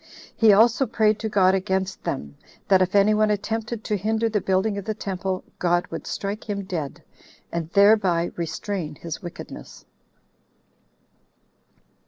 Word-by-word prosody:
He 225 -2 +6
also 235 +5 +4
prayed 215 -2 +2
to 220 - -3
God 190 -3 +4
against 190 0 -1
them, 70 0 -4 0.3
that 190 -1 +5
if 185 +2 +1
any 200 +1 +5
one 215 0 +3
attempted 220 +2 -2
to 210 - -1
hinder 220 +3 0
the 210 -2 0
building 190 +2 +1
of 195 - -8
the 215 - -2
temple, 190 -2 -3 0.2
God 175 0 +2
would - - -6
strike 205 +2 -4
him 200 -1 -2
dead, 170 -7 -5 0.5
and 165 -1 -3
thereby 195 -4 +4
restrain 170 -1 -4
his 165 +4 -7
wickedness." 175 -2 -10
200 Hz, 145 wpm, -24 LUFS, 185-215 Hz, 0.5 s, He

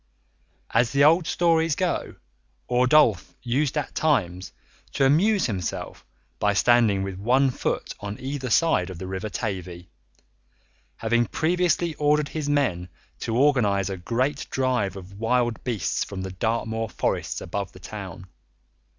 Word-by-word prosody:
As 115 0 +2
the 140 0 +4
old 165 +3 +5
stories 165 -2 +2
go, 180 0 -2 0.5
Ordulph 125 - +3
used 130 +4 0
at 145 - -3
times 95 - 0 0.4
to 135 - +2
amuse 190 +9 +3
himself 95 -8 -4 0.3
by 105 0 +2
standing 110 -2 +3
with 95 -1 -5
one 130 +6 +3
foot - - -3
on 105 +3 -6
either 135 -1 -4
side 110 - +2
of 95 - -7
the 95 - -6
River 95 +3 -4
Tavy, 90 -6 -5 1.1
having 120 +1 +1
previously 170 +1 +1
ordered 150 0 +2
his 150 -2 -3
men 90 -12 0 0.3
to 115 - -2
organise 110 -9 +3
a 95 - -4
great 130 - -1
drive 125 -7 0
of 100 +1 -11
wild 120 0 0
beasts 115 -9 -1
from 95 -2 -6
the 95 - -5
Dartmoor 110 +2 -2
forests - - -2
above 100 +2 -4
the 95 - -14
town. 95 -3 -8
120 Hz, 140 wpm, -25 LUFS, 95-145 Hz, 1.1 s, old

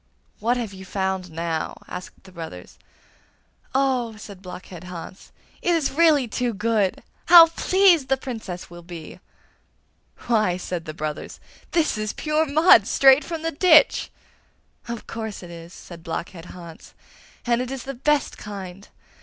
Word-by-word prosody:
'What 235 +3 +1
have 225 -5 -4
you 190 0 -10
found 190 -1 -2
now?' 165 0 -3
asked 180 - -9
the 190 - -15
brothers. 160 - -9 1.0
'Oh,' 255 -4 +1
said 200 -3 -11
Blockhead 180 -1 -10
Hans, 180 +1 -9 0.3
'it 350 - +2
is 310 -4 0
really 300 -4 +4
too 240 0 -2
good! 210 -2 0 0.2
How 345 -1 +11
pleased 350 -3 +3
the 270 0 +2
Princess 220 -9 -7
will 175 0 -10
be!' 170 -2 -10 1.1
'Why!' 215 -6 +2
said 180 -2 -5
the 155 - -7
brothers, 155 -1 -5 0.3
'this 320 -10 +1
is 215 0 -2
pure 310 +1 0
mud, 315 +5 +6
straight 270 +1 +6
from 330 -2 -5
the 330 - -1
ditch.' 330 +7 +5 0.8
'Of 235 -1 -6
course 220 -4 -6
it 175 - -10
is!' 170 0 -10
said 170 -2 -12
Blockhead 165 +1 -6
Hans, 170 -3 -12 0.5
'and 240 0 +2
it 250 - -4
is 265 -2 -5
the 275 - -5
best 290 +3 0
kind! 195 -2 -8
215 Hz, 150 wpm, -23 LUFS, 180-275 Hz, 1.1 s, How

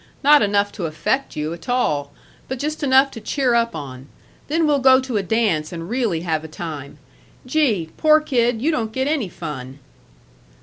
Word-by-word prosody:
Not 295 +1 +7
enough 205 0 +1
to 175 -6 -4
affect 265 - -2
you 155 +2 -3
a 170 - -8
tall, 150 - -1 0.4
but 260 - -4
just 305 +5 -3
enough 270 -1 +4
to 225 - -9
cheer 265 -1 0
up 235 0 +1
on. 130 -2 -8 0.4
Then 320 +2 +1
we'll 295 -2 +2
go 260 0 +6
to 260 -4 -3
a - - +1
dance 195 -7 0
and 170 +2 -7
really 230 -10 0
have 160 -3 -1
a - - -7
time. 150 -3 -7 0.5
Gee! 245 - +1
poor 310 0 +5
kid, 245 -6 0
you 320 - +2
don't 230 -8 -2
get 260 +2 -1
any 285 -10 0
fun." 135 -6 -7
225 Hz, 185 wpm, -21 LUFS, 160-265 Hz, 0.5 s, Not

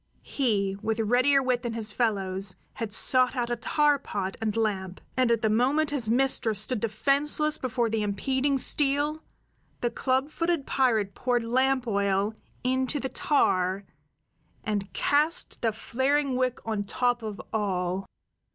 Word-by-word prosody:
He, 200 -8 0
with 220 0 -1
readier 255 +5 +3
wit 250 -2 0
than 240 -2 -4
his 225 -2 -1
fellows, 195 -4 0 0.2
had 225 -2 -5
sought 255 +4 +3
out 240 -1 -1
a - - +1
tar 295 +5 +2
pot 195 -7 -4
and 220 0 -1
lamp; 190 -4 -1 0.2
and 255 -2 +2
at 230 -1 +1
the - - +4
moment 280 +7 +2
his 255 -7 0
mistress 230 -4 +2
stood 235 +2 -2
defenseless 280 +8 0
before 245 -2 0
the 220 -1 -1
impeding 265 +7 0
steel, 290 +3 0 0.6
the 240 - 0
club 265 +4 0
footed 335 -4 -1
pirate 220 -7 +1
poured 245 -2 0
lamp 260 +2 +1
oil 200 -1 0 0.3
into 260 +3 0
the 265 - -3
tar, 190 -9 +1 0.8
and 205 -2 -2
cast 300 +4 +1
the 225 - +2
flaring 265 +5 0
wick 255 -1 0
on 215 -2 -1
top 245 +4 0
of 215 -2 -6
all. 190 -3 -1
240 Hz, 150 wpm, -27 LUFS, 210-270 Hz, 0.8 s, the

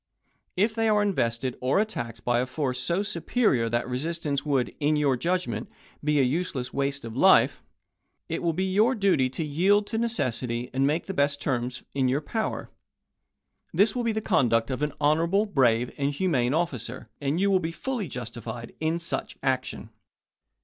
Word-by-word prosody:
If 210 +4 +2
they 225 0 +1
are 210 -1 +3
invested 125 - 0
or 130 +9 +2
attacked 205 - -3
by 120 -1 +2
a 125 - 0
force 130 -2 -2
so 175 +4 0
superior 170 - +1
that 120 +1 -1
resist 160 +7 -3
ance 140 -1 0
would, 135 -5 0
in 150 0 +2
your 145 -3 +2
judgment, 125 - -2 0.3
be 150 0 +2
a - - +5
useless 130 -2 -2
waste 140 -1 -1
of 115 -1 -7
life, - - +5 0.7
it - - -3
will 170 - +1
be 180 +4 -1
your 215 +7 +3
duty 180 - +2
to 135 +6 -3
yield 190 +8 +3
to 225 +1 -2
necessity, 125 - -2
and 135 +1 +2
make 155 +4 0
the 195 - -4
best 145 -2 +1
terms 125 -2 -2
in 135 -2 +1
your 130 +3 +2
power. 220 +8 -3 1.0
This 205 +5 +4
will 245 - -1
be 230 - +1
the 220 0 -2
conduct 115 - +2
of 130 - -3
an 150 -1 0
honorable, 165 +7 +3
brave, 125 - +2
and 140 0 +1
humane 140 -5 +1
officer, 130 -7 -3
and 145 +4 0
you 200 +1 +3
will 190 - +4
be 165 -1 -3
fully 235 +2 -3
justified 115 -2 -7
in 160 +1 0
such 170 0 -4
action. 130 -1 -2
145 Hz, 180 wpm, -26 LUFS, 125-185 Hz, 1.0 s, a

